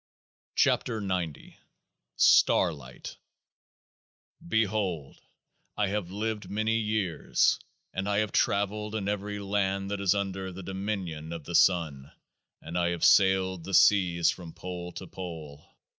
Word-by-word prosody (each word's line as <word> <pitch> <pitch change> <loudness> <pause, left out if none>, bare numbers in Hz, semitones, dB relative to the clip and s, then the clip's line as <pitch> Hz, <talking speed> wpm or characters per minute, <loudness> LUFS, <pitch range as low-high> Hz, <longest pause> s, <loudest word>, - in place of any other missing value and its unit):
107 110 -4 +1
KEOAAH 90 -4 -1
P - - -17 0.6
STARLIGHT 70 -8 +2 1.3
Behold! 100 -8 -1 0.6
I 105 -2 +1
have 100 -3 -2
lived 105 0 -3
many 110 +3 0
years, 105 -8 +1 0.3
and 95 +2 -2
I 100 - +1
have 105 -1 0
travelled 105 +2 0
in 100 -3 -2
every 105 0 -2
land 100 -1 -1
that 100 -1 -2
is 100 0 +3
under 95 -1 -3
the 95 +1 -9
dominion 95 -5 -4
of 85 -2 -6
the 85 - -7
Sun, 80 -7 +2 0.5
and 85 +2 -3
I 85 0 +2
have 85 -1 0
sailed 95 -2 +4
the 95 +1 -1
seas 90 -4 +5
from 85 -3 -9
pole 90 -1 -6
to 95 - -7
pole. 80 -6 -8
95 Hz, 130 wpm, -28 LUFS, 85-100 Hz, 1.3 s, seas